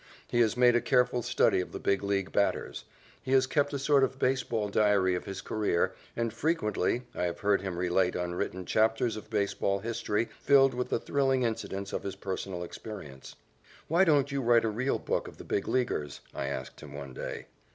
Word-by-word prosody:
He 120 Hz, -, 0 dB
has 115 Hz, 0 st, +3 dB
made 125 Hz, -1 st, +5 dB
a 120 Hz, -, +3 dB
careful 125 Hz, -1 st, +2 dB
study 115 Hz, -5 st, +2 dB
of 90 Hz, -, -8 dB
the -, -, -4 dB
Big 100 Hz, -1 st, +1 dB
League 100 Hz, -1 st, -1 dB
batters. 65 Hz, -10 st, 0 dB, 0.4 s
He 130 Hz, -, -2 dB
has 130 Hz, -1 st, +5 dB
kept 145 Hz, +2 st, +1 dB
a 140 Hz, -, -2 dB
sort 140 Hz, 0 st, +3 dB
of 130 Hz, 0 st, 0 dB
baseball 125 Hz, -5 st, 0 dB
diary 100 Hz, -3 st, +3 dB
of 90 Hz, -, -3 dB
his 95 Hz, -1 st, -5 dB
career, 105 Hz, -5 st, 0 dB, 0.2 s
and, 115 Hz, -2 st, -1 dB
frequently, 120 Hz, -, 0 dB
I 90 Hz, -, -1 dB
have 85 Hz, -1 st, -4 dB
heard 100 Hz, -1 st, +2 dB
him 95 Hz, -3 st, -4 dB
relate 90 Hz, +1 st, +1 dB
unwritten 90 Hz, +1 st, -3 dB
chapters 110 Hz, +2 st, +2 dB
of 110 Hz, -, -9 dB
baseball 100 Hz, -2 st, 0 dB
history 110 Hz, +1 st, -2 dB
filled 135 Hz, -1 st, +5 dB
with 125 Hz, 0 st, -3 dB
the -, -, +1 dB
thrilling 135 Hz, -2 st, +1 dB
incidents 100 Hz, -4 st, -3 dB
of -, -, -2 dB
his 100 Hz, -, -5 dB
personal 95 Hz, -2 st, -4 dB
experience. 85 Hz, -8 st, -9 dB, 0.5 s
"Why 170 Hz, +4 st, +4 dB
don't 145 Hz, -5 st, +3 dB
you 140 Hz, -1 st, -1 dB
write 120 Hz, -1 st, +4 dB
a -, -, +1 dB
real 130 Hz, +6 st, 0 dB
book -, -, -2 dB
of -, -, -11 dB
the -, -, -9 dB
Big 100 Hz, -, -2 dB
Leaguers?" 100 Hz, -, -1 dB
I 70 Hz, -, -3 dB
asked 65 Hz, -2 st, -5 dB
him -, -, -10 dB
one 70 Hz, -2 st, -7 dB
day. -, -, -6 dB
110 Hz, 200 wpm, -29 LUFS, 95-125 Hz, 0.5 s, made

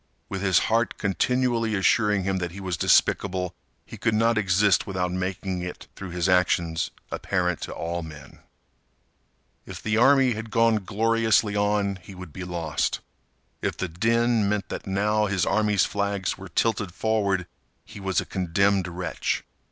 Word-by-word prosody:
With 95 Hz, -1 st, -4 dB
his 95 Hz, -2 st, +3 dB
heart 115 Hz, +1 st, +1 dB
continually 115 Hz, +2 st, +1 dB
assuring 105 Hz, 0 st, +2 dB
him 95 Hz, 0 st, 0 dB
that 90 Hz, -1 st, -2 dB
he 95 Hz, +3 st, -10 dB
was 95 Hz, -2 st, -2 dB
despicable, 90 Hz, +3 st, +2 dB, 0.3 s
he -, -, -10 dB
could 115 Hz, -2 st, +1 dB
not 115 Hz, +1 st, +3 dB
exist 100 Hz, -2 st, +3 dB
without 90 Hz, -2 st, -1 dB
making 95 Hz, 0 st, -3 dB
it, 90 Hz, 0 st, -7 dB
through 95 Hz, -, -7 dB
his 90 Hz, 0 st, -1 dB
actions, 85 Hz, -3 st, +2 dB, 0.2 s
apparent 90 Hz, -3 st, -1 dB
to -, -, -5 dB
all 85 Hz, +1 st, -3 dB
men. 80 Hz, -3 st, -11 dB, 1.3 s
If -, -, -7 dB
the 110 Hz, 0 st, -1 dB
army 135 Hz, +1 st, +5 dB
had 110 Hz, +1 st, -6 dB
gone 115 Hz, -2 st, +2 dB
gloriously 110 Hz, -1 st, +2 dB
on 105 Hz, -1 st, +1 dB
he 95 Hz, +1 st, -13 dB
would 90 Hz, -4 st, -10 dB
be 95 Hz, -, -6 dB
lost. 85 Hz, -4 st, -2 dB, 0.6 s
If -, -, -2 dB
the 95 Hz, -, -2 dB
din 115 Hz, +4 st, +1 dB
meant 105 Hz, -2 st, -1 dB
that -, -, -6 dB
now 105 Hz, +2 st, +1 dB
his 95 Hz, -3 st, 0 dB
army's 105 Hz, -1 st, +2 dB
flags 100 Hz, -2 st, -1 dB
were 95 Hz, 0 st, -10 dB
tilted 100 Hz, -1 st, 0 dB
forward 100 Hz, -5 st, 0 dB, 0.4 s
he -, -, -11 dB
was 95 Hz, -2 st, 0 dB
a -, -, -3 dB
condemned 95 Hz, +1 st, +1 dB
wretch. 90 Hz, +1 st, -3 dB
100 Hz, 160 wpm, -25 LUFS, 90-110 Hz, 1.3 s, army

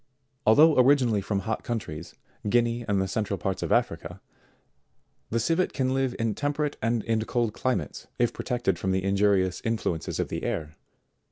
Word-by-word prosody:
Although 150 Hz, +7 st, +6 dB
originally 125 Hz, -5 st, +4 dB
from 100 Hz, 0 st, -2 dB
hot 110 Hz, +3 st, -3 dB
countries, 110 Hz, -10 st, -5 dB, 0.3 s
Guinea 120 Hz, +1 st, +2 dB
and 100 Hz, -2 st, +1 dB
the 95 Hz, -, 0 dB
central 100 Hz, 0 st, -2 dB
parts 95 Hz, 0 st, -3 dB
of -, -, -3 dB
Africa, 90 Hz, -6 st, 0 dB, 1.1 s
the 115 Hz, -, 0 dB
Civet 165 Hz, +10 st, +1 dB
can 130 Hz, -2 st, 0 dB
live 135 Hz, -2 st, 0 dB
in 115 Hz, -1 st, 0 dB
temperate 145 Hz, +3 st, -1 dB
and 115 Hz, -1 st, 0 dB
in 110 Hz, -1 st, 0 dB
cold 120 Hz, -3 st, 0 dB
climates, 100 Hz, -, -2 dB
if 120 Hz, -1 st, +1 dB
protected 120 Hz, -8 st, -1 dB
from 95 Hz, 0 st, 0 dB
the 95 Hz, 0 st, 0 dB
injurious 100 Hz, -2 st, +2 dB
influences 110 Hz, -8 st, -2 dB
of -, -, -1 dB
the -, -, -3 dB
air. 80 Hz, -1 st, -3 dB
110 Hz, 165 wpm, -27 LUFS, 95-120 Hz, 1.1 s, Although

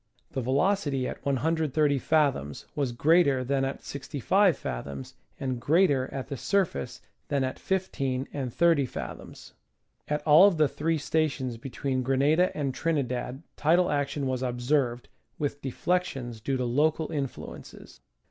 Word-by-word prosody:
The 135 Hz, -, -2 dB
velocity 140 Hz, -, +1 dB
at -, -, -7 dB
130 150 Hz, +1 st, +1 dB
fath 150 Hz, -1 st, +3 dB
oms 70 Hz, 0 st, -8 dB
was 140 Hz, -4 st, -1 dB
greater 140 Hz, 0 st, +3 dB
than 135 Hz, +1 st, 0 dB
at 135 Hz, +1 st, -3 dB
65 155 Hz, -, +1 dB
fathoms, 65 Hz, +2 st, -6 dB, 0.3 s
and 130 Hz, -3 st, -3 dB
greater 145 Hz, -3 st, +3 dB
at 135 Hz, -, -5 dB
the 140 Hz, -, -5 dB
surface 185 Hz, -, -1 dB, 0.3 s
than 140 Hz, -2 st, 0 dB
at 130 Hz, -, -3 dB
15 140 Hz, -9 st, -1 dB
and 130 Hz, -4 st, -3 dB
30 165 Hz, -2 st, +3 dB
fathoms. -, -, -8 dB, 0.5 s
At 150 Hz, 0 st, -1 dB
all 160 Hz, +6 st, +8 dB
of 190 Hz, -5 st, +1 dB
the 155 Hz, -1 st, +4 dB
three 160 Hz, +3 st, -1 dB
stations 145 Hz, -5 st, -1 dB
between 130 Hz, +2 st, -3 dB
Grenada 140 Hz, +7 st, +3 dB
and 140 Hz, -3 st, -1 dB
Trinidad 130 Hz, -2 st, -2 dB
tidal 175 Hz, +4 st, +3 dB
action 145 Hz, 0 st, -1 dB
was 130 Hz, -1 st, -1 dB
observed, 125 Hz, 0 st, 0 dB, 0.3 s
with 145 Hz, -1 st, -3 dB
deflections 135 Hz, -5 st, -2 dB
due 135 Hz, +4 st, -1 dB
to 125 Hz, -, -1 dB
local 155 Hz, +6 st, +1 dB
influences. 140 Hz, -4 st, -7 dB
140 Hz, 140 wpm, -27 LUFS, 130-155 Hz, 0.5 s, all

